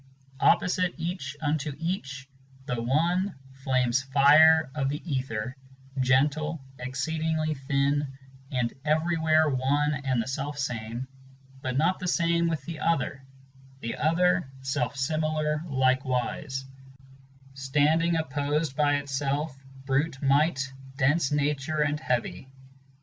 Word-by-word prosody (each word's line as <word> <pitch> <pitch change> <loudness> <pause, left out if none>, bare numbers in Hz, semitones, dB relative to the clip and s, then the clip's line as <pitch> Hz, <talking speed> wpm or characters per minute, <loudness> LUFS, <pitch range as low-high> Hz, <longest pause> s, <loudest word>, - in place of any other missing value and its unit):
1 - - +7
Opposite 180 0 -1
each 165 -5 -4
unto 150 -1 -1
eachŌĆö 135 -4 -4 0.4
the 120 -3 -2
one, 170 +10 +1 0.3
flame's 130 -1 +2
fire 145 +3 +6
of 135 -3 -1
the 145 +2 -3
ether, 130 -4 -3 0.4
Gentle, 145 +5 +2 0.2
exceedingly 155 +5 -1
thin, 140 +1 0 0.4
and 125 -3 -1
everywhere 155 0 +2
one 145 +2 +1
and 135 -4 -1
the 115 - -2
self 140 +2 -3
same, 120 -2 -4 0.5
But 130 -2 -2
not 170 +6 +2
the 180 - -4
same 170 -1 +2
with 160 -2 -2
the 165 -3 -6
other; 140 -4 0 0.6
the 115 - -3
other, 180 0 +2
self 135 -2 -1
similar 155 +2 0
likewise, 130 0 0 0.9
Standing 150 +5 +2
opposed 145 -1 -1
by 145 -1 +3
itself, 140 +1 -2 0.3
brute 135 +1 0
might, 140 0 +2 0.3
dense 145 +1 +2
nature 150 +1 0
and 150 0 -1
heavy. 125 0 -2
145 Hz, 115 wpm, -27 LUFS, 130-160 Hz, 0.9 s, 1